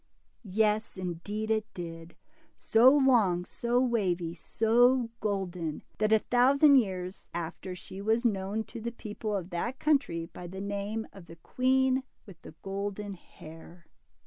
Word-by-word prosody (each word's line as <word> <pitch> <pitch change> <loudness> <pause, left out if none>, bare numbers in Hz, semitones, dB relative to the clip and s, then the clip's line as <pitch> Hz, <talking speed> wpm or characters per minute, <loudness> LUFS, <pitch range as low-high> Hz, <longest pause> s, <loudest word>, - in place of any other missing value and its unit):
Yes, 210 0 0
indeed, 185 +5 -4
it 220 0 -1
did, 165 -1 -8 0.2
— 320 - -35
so, 230 +3 +5
long, 235 -11 +3
so 240 +5 0
wavy, 190 -9 0
so 230 +7 +2
golden, 180 -6 -3 0.2
that 215 0 +2
a 220 - +7
thousand 275 +6 +5
years 185 -5 -2
after 175 +2 -5
she 190 +1 -9
was 225 +4 +1
known 205 0 0
to 230 +1 -9
the 235 +1 -3
people 215 -1 -5
of 185 -1 -4
that 235 +10 -3
country 270 - +1
by 175 +1 -10
the 190 +2 -8
name 205 +2 -3
of 190 -4 -13
the 165 - -11
Queen 260 +8 +1 0.2
with 185 -6 -14
the 155 - -12
Golden 200 +1 -4
Hair. 165 -1 -14
205 Hz, 145 wpm, -29 LUFS, 180-235 Hz, 0.2 s, a